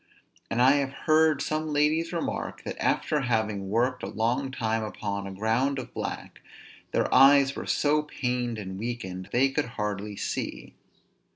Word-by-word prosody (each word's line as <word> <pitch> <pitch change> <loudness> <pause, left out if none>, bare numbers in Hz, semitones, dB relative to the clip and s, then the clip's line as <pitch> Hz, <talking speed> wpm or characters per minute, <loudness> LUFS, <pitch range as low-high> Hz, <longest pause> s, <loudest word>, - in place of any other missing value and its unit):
And 120 +2 +2
I 135 +3 +6
have 135 -1 -1
heard 155 -2 +4
some 155 0 -2
ladies 150 +3 +2
remark, 170 -2 -3
that - - -5
after 150 - +1
having 110 -5 -1
worked 125 +4 +1
a - - -4
long 120 +5 0
time 115 -3 -1
upon 100 -2 -4
a - - -6
ground 115 +8 0
of 125 -2 -6
black, - - -6 0.5
their - - 0
eyes 140 +1 +6
were - - -6
so 150 +1 +2
pained 125 -5 -2
and 95 -2 -6
weakened, 95 -5 -5
they 135 +3 +3
could 145 +2 -1
hardly 105 0 -3
see. - - -4
125 Hz, 160 wpm, -27 LUFS, 110-140 Hz, 0.5 s, I